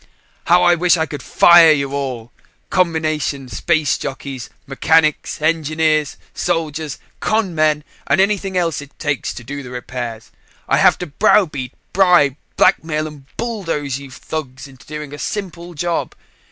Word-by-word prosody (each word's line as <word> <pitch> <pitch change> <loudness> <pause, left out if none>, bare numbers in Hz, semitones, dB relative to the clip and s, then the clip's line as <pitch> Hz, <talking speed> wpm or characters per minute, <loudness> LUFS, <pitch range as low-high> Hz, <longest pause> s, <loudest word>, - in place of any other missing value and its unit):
"How 175 +1 +5
I 175 0 +6
wish 175 +1 +3
I 160 - +1
could 145 -2 -7
fire 170 +2 +7
you 140 -2 0
all! 125 -5 -4 0.4
Combination 155 -6 0
space 155 -1 0
jockeys, 135 -3 -6 0.2
mechanics, 155 +2 +1
engineers, 155 -1 +1 0.2
soldiers, 155 -4 -2 0.2
con 215 -4 0
men 155 -1 +2 0.2
and - - +2
anything 195 -1 +1
else 165 -4 0
it 145 0 -14
takes 150 -4 -2
to 120 - -8
do 140 +4 -6
the 125 - -9
repairs. 120 -2 -6 0.4
I - - +3
have - - +5
to - - -5
browbeat, 145 - +1 0.2
bribe, 175 -8 +4 0.2
blackmail 155 -1 +2
and 150 -3 -10
bulldoze 165 - -3
you 140 -1 -10
thugs 135 0 -6
into 130 -2 -17
doing 150 -1 -7
a 145 - -8
simple 175 -3 -5
job. 170 +3 -2
155 Hz, 145 wpm, -18 LUFS, 140-170 Hz, 0.4 s, fire